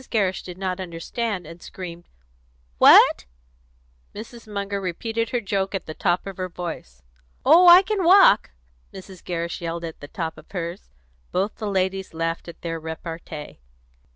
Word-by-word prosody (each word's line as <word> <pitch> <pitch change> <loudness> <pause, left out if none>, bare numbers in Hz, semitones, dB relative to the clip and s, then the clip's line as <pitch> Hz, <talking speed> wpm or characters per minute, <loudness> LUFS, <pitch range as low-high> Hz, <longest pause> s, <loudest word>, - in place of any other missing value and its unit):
Gerrish 195 -5 0
did 180 -1 -10
not 185 -1 -3
understand, 185 +3 -4
and 165 +2 -12
screamed, 175 -2 -9 0.7
"What?" - - +7 0.9
Mrs. 230 +1 -10
Munger 200 -1 -3
repeated 225 +5 -3
her 245 - 0
joke 195 -2 -2
at 190 - -4
the 155 - -7
top 175 +3 0
of 195 -2 -7
her 185 -1 -3
voice. 160 - -7 0.4
"Oh, 360 +2 +7
I 355 +2 +10
can 400 -1 -1
walk!" 360 - +6 0.4
Mrs. 190 -1 -12
Gerrish 170 -1 -4
yelled 170 0 -4
at 165 - -8
the 145 - -9
top 165 +1 -5
of - - -18
hers. 175 0 -6 0.4
Both 195 +3 -1
the 215 -2 -4
ladies 190 -2 -1
laughed 165 +1 -3
at 170 - -11
their 165 -1 -3
repartee. 160 - -8
185 Hz, 155 wpm, -23 LUFS, 170-205 Hz, 0.9 s, I